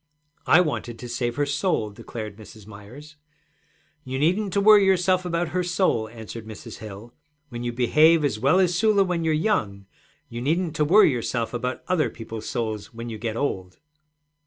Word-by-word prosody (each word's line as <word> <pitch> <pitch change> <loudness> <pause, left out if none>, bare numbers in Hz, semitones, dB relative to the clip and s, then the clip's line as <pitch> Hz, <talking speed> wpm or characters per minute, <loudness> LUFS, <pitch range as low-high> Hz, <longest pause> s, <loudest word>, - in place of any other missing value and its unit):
'I 170 - +6
wanted 130 -8 -3
to 125 - -8
save 120 0 -2
her 145 - 0
soul,' 140 - -1
declared 110 -1 -8
Mrs. 110 -1 -14
Myers. 120 +9 -13 0.9
'You 130 0 -4
needn't 185 +8 +1
to 200 - +2
worry 210 0 +7
yourself 185 -1 +2
about 170 -1 -1
her 180 - -1
soul,' 175 - 0
answered 110 -1 -9
Mrs. 110 - -10
Hill. 110 +2 -10 0.4
'When 120 -1 -6
you 120 - -2
behave 150 +6 +4
as 120 -6 -1
well 140 +10 +3
as 180 -2 +3
Sula 205 +2 +3
when 175 -3 -2
you're 160 -1 +1
young, 115 - -1 0.4
you 120 +1 -7
needn't 160 +4 -1
to 150 - +2
worry 185 +1 +6
yourself 115 -1 -2
about 125 +1 -3
other 180 -3 +1
people's 115 -1 -8
souls 110 -5 -4
when 115 +1 -7
you 110 -2 -7
get 110 0 -3
old.' 95 -10 -3
130 Hz, 180 wpm, -24 LUFS, 115-175 Hz, 0.9 s, worry